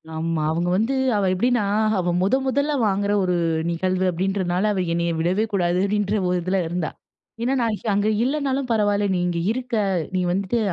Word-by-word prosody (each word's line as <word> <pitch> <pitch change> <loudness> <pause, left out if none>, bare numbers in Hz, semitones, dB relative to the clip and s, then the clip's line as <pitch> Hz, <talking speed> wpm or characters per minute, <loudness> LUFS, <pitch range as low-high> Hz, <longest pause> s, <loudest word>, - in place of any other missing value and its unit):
ஆமா 160 0 -1
அவங்க 170 +2 -1
வந்து 225 +6 0 0.2
அவ 200 - +1
எப்டின்னா 240 +4 +1 0.4
அவ 180 -1 0
முதன் 260 +8 +2
முதலா 280 +3 +1
வாங்குற 200 +1 0
ஒரு 180 -1 +1 0.3
நிகழ்வு 185 +2 0
அப்டின்றதுனால 185 +2 0
அவ 190 - -1
என்னய 170 0 0
விடவே 180 +6 +1
கூடாது. 175 -2 +1
அப்டின்ற 205 0 0
ஒரு 180 - +1
இதில 185 +2 0
இருந்தா. 170 -1 -2 0.5
ஏன்னா 255 +3 +1
நான் 225 -2 0 0.2
அங்கே 205 +2 +1
இல்லனாலும் 275 -1 -1
பரவாயில்ல 205 -2 +2
"நீ - - 0
இங்கே 170 -1 -1
இருக்க. 250 0 -3 0.4
நீ 185 - +1
வந்துட்டு 195 +5 0
195 Hz, 170 wpm, -22 LUFS, 180-225 Hz, 0.5 s, முதன்